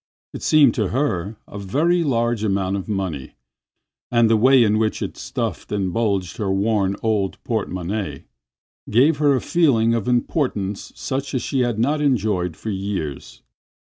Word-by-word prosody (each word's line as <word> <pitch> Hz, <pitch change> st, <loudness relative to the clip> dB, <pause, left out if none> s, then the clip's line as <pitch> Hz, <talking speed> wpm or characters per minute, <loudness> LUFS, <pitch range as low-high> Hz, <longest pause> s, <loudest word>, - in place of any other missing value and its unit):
It -, -, -7 dB
seemed 145 Hz, -6 st, +5 dB
to -, -, 0 dB
her 110 Hz, -6 st, -1 dB
a 100 Hz, -, -8 dB
very 160 Hz, -, +1 dB
large 120 Hz, -5 st, 0 dB
amount 95 Hz, -2 st, 0 dB
of 100 Hz, +1 st, -5 dB
money, 95 Hz, -10 st, -3 dB, 0.7 s
and 120 Hz, -2 st, +3 dB
the -, -, +5 dB
way 130 Hz, +3 st, +5 dB
in 105 Hz, -1 st, +2 dB
which 110 Hz, -1 st, 0 dB
it -, -, -5 dB
stuffed -, -, -4 dB
and 95 Hz, -3 st, -1 dB
bulged 100 Hz, -5 st, -1 dB
her 100 Hz, -3 st, -1 dB
worn 100 Hz, 0 st, +1 dB
old 105 Hz, -4 st, 0 dB
porte 110 Hz, -3 st, -2 dB
monnaie 90 Hz, -4 st, -4 dB, 0.7 s
gave 140 Hz, +8 st, +4 dB
her 145 Hz, -1 st, +3 dB
a 130 Hz, -, -1 dB
feeling 120 Hz, -10 st, +2 dB
of 115 Hz, -2 st, -1 dB
importance 120 Hz, -, -1 dB
such 135 Hz, +1 st, -3 dB
as 125 Hz, -, -1 dB
she 135 Hz, -, -1 dB
had 120 Hz, -3 st, 0 dB
not 145 Hz, +7 st, +1 dB
enjoyed 105 Hz, -, 0 dB
for 110 Hz, -, -5 dB
years. 95 Hz, -8 st, -5 dB
110 Hz, 165 wpm, -21 LUFS, 95-125 Hz, 0.7 s, seemed